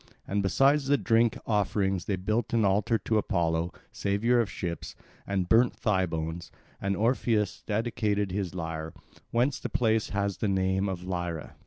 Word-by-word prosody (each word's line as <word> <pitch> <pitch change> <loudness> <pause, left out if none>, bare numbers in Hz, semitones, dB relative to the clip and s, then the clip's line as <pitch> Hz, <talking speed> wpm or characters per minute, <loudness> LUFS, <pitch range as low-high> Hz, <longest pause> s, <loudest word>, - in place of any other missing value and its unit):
And 100 +1 0
besides 135 +9 +3
the 145 +1 +4
drink 115 -2 +2
offerings 100 -3 0
they 100 - 0
built 105 +5 -1
an 110 -2 +3
altar 100 +4 +2
to 110 0 0
Apollo, 85 -4 0 0.2
saviour 110 +5 +1
of 115 - +1
ships, 85 -1 -5 0.3
and 95 -3 0
burnt 120 +4 +4
thigh 95 -3 +1
bones; 80 +1 -4 0.3
and 100 0 0
Orpheus 110 -3 +1
dedicated 105 -2 0
his 95 -2 -3
lyre; 80 -2 -4 0.3
whence 125 +4 +1
the - - -4
place 110 -4 +1
has 100 -1 -1
the 110 - -1
name 95 0 +1
of 90 -2 -4
Lyra. 85 -3 -4
100 Hz, 160 wpm, -28 LUFS, 90-115 Hz, 0.3 s, the